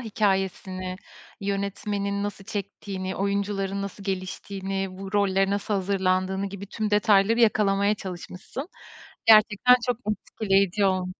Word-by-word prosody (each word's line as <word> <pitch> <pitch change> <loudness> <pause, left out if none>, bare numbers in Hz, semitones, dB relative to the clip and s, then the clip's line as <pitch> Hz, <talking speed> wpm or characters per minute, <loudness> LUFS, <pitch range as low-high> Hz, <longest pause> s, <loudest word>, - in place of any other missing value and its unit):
Hikâyesini, 190 -4 -1 0.4
yönetmenin 200 0 -2
nasıl 205 -1 -5
çektiğini, 195 -1 -5
oyuncuların 200 0 -1
nasıl 200 0 -7
geliştiğini, 195 0 -3
bu 195 +1 -7
rollere 195 -1 +2
nasıl 205 +1 -1
hazırlandığını 190 0 0
gibi 200 0 -7
tüm 215 +1 -3
detayları 210 +2 +4
yakalamaya 205 -2 +3
çalışmışsın. 190 - -7 0.6
Gerçekten 220 +3 +7
çok 245 -2 +1 0.3
etkileyici 200 -1 +2
ol 185 -1 +1
200 Hz, 105 wpm, -26 LUFS, 190-205 Hz, 0.6 s, Gerçekten